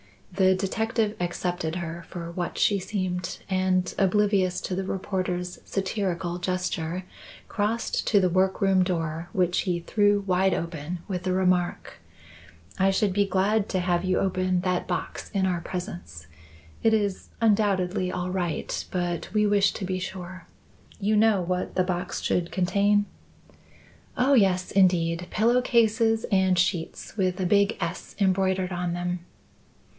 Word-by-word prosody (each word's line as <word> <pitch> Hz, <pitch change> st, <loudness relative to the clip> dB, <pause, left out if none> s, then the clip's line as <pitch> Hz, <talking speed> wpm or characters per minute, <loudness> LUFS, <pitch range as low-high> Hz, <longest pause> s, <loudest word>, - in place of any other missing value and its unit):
The 190 Hz, 0 st, +3 dB
detective 220 Hz, +3 st, -1 dB
accepted 175 Hz, -2 st, -2 dB
her 170 Hz, -1 st, -5 dB
for 170 Hz, -2 st, -6 dB
what 175 Hz, 0 st, -4 dB
she 200 Hz, -1 st, +3 dB
seemed 185 Hz, -2 st, -3 dB
and, 185 Hz, -1 st, +1 dB
oblivious 195 Hz, -2 st, +2 dB
to -, -, -4 dB
the 190 Hz, -, -2 dB
reporter's 185 Hz, -2 st, -3 dB
satirical 185 Hz, -3 st, -2 dB
gesture, 180 Hz, -1 st, -2 dB, 0.4 s
crossed 220 Hz, +2 st, -1 dB
to 205 Hz, -, +5 dB
the 185 Hz, -2 st, +2 dB
work 190 Hz, +2 st, +1 dB
room 195 Hz, -1 st, +4 dB
door, 165 Hz, -2 st, -2 dB
which 180 Hz, -2 st, +2 dB
he 175 Hz, -3 st, -1 dB
threw 205 Hz, +3 st, +2 dB
wide 190 Hz, -1 st, +2 dB
open 170 Hz, +1 st, -4 dB
with 180 Hz, -3 st, -3 dB
the 185 Hz, 0 st, 0 dB
remark: 180 Hz, -1 st, 0 dB, 0.8 s
"I 190 Hz, +1 st, +4 dB
should 195 Hz, 0 st, +1 dB
be 200 Hz, +1 st, +2 dB
glad 195 Hz, +2 st, +1 dB
to 185 Hz, -, 0 dB
have 175 Hz, -1 st, +1 dB
you 185 Hz, 0 st, +1 dB
open 185 Hz, -1 st, 0 dB
that 180 Hz, -1 st, -1 dB
box -, -, -4 dB
in 195 Hz, -2 st, +1 dB
our 180 Hz, -2 st, 0 dB
presence. 175 Hz, -, -6 dB, 0.6 s
It 225 Hz, -1 st, +4 dB
is 205 Hz, -3 st, -2 dB
undoubtedly 200 Hz, -4 st, +2 dB
all 180 Hz, 0 st, -3 dB
right, 175 Hz, -3 st, -2 dB
but 175 Hz, -2 st, -2 dB
we 210 Hz, -1 st, +3 dB
wish 200 Hz, -1 st, +3 dB
to 195 Hz, -, -4 dB
be 185 Hz, 0 st, -2 dB
sure. 185 Hz, -1 st, -7 dB, 0.5 s
You 210 Hz, +1 st, +1 dB
know 215 Hz, -2 st, +4 dB
what 180 Hz, +1 st, -2 dB
the 185 Hz, -, +3 dB
box 180 Hz, -1 st, -3 dB
should 175 Hz, -1 st, 0 dB
contain?" 200 Hz, +3 st, +2 dB, 1.1 s
"Oh, 260 Hz, +3 st, +3 dB
yes, 190 Hz, -6 st, +3 dB
indeed; 175 Hz, -2 st, +2 dB
pillow 235 Hz, +3 st, +3 dB
cases 225 Hz, -2 st, +2 dB
and 190 Hz, -2 st, +3 dB
sheets, 175 Hz, -2 st, -1 dB
with 185 Hz, -2 st, 0 dB
a 185 Hz, -, 0 dB
big 200 Hz, +3 st, +3 dB
S 170 Hz, +1 st, -5 dB
embroidered 190 Hz, -1 st, +1 dB
on 175 Hz, -1 st, -2 dB
them." 175 Hz, 0 st, -2 dB
185 Hz, 150 wpm, -26 LUFS, 180-200 Hz, 1.1 s, to